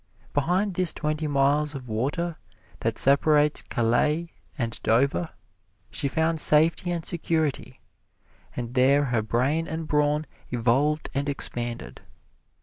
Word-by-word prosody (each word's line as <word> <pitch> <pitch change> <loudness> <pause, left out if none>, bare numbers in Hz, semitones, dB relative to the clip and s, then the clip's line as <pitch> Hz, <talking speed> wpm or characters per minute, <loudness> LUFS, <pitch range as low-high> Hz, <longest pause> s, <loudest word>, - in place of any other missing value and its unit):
Behind 180 +8 0
this 180 -1 -1
twenty 155 +1 -3
miles 145 +1 +1
of 130 -2 -8
water 145 +10 -3 0.4
that - - -2
separates 150 +2 +4
Calais 150 +8 0 0.3
and 115 -4 -4
Dover 140 +8 +1 0.6
she 140 - -1
found 160 +3 +1
safety 160 +4 +4
and 170 -2 -3
security, 160 -4 -2 0.7
and 120 0 -5
there 135 +3 +3
her 120 -4 0
brain 130 +9 -1
and 160 0 -5
brawn 150 +1 0 0.2
evolved 130 +6 0
and 140 +1 -2
expanded. 120 - 0
145 Hz, 120 wpm, -25 LUFS, 125-160 Hz, 0.7 s, separates